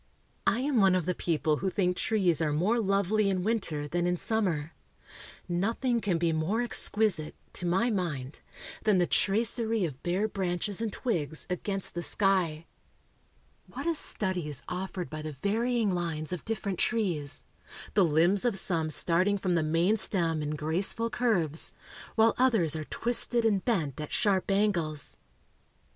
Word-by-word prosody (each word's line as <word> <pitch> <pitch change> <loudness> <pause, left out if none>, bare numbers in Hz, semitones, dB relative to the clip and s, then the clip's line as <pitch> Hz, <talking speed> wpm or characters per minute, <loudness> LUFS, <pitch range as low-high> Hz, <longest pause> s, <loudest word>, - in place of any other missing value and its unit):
I 240 - +3
am 275 -1 0
one 190 -1 +5
of 180 -3 0
the 180 - 0
people 155 -3 0
who 190 - -1
think 180 -1 +1
trees 180 -6 +1
are 155 -2 +1
more 190 +11 +2
lovely 200 0 +2
in 185 -2 0
winter 180 -9 -1
than 175 +3 0
in 180 0 +1
summer. 170 -8 -1 0.7
Nothing 225 +7 0
can 190 -5 +1
be 165 -1 +1
more 160 +8 0
exquisite, 210 -8 +1 0.2
to 180 - -3
my 190 +8 +2
mind, 150 -9 -3 0.4
than 210 -3 +4
the 175 - +3
tracery 220 +2 +1
of 140 -4 -6
bare 185 +5 0
branches 195 +1 -2
and 225 -2 -1
twigs 160 - -2
against 195 +2 -3
the 175 - -3
sky. 175 -5 +1 1.0
What - - -7
a 335 - +2
study 185 - -2
is 145 - -6
offered 180 0 -4
by 155 0 -6
the 155 0 -5
varying 225 0 +1
lines 165 -2 -3
of 180 - -6
different 205 -4 -3
trees 170 - 0 0.5
the 205 - +5
limbs 170 +5 +3
of 240 -5 +1
some 165 -4 +1
starting 185 +6 +2
from 185 -2 -1
the 170 - +2
main 165 +7 +2
stem 165 -6 0
in 150 0 -2
graceful 185 +9 -1
curves, 180 -11 0 0.4
while 225 0 +5
others 220 - +3
are 155 -1 -4
twisted 240 +2 +1
and 200 -4 +2
bent 160 - -1
at 150 - -6
sharp 195 -2 +1
angles. 180 -7 0
185 Hz, 160 wpm, -29 LUFS, 160-215 Hz, 1.0 s, one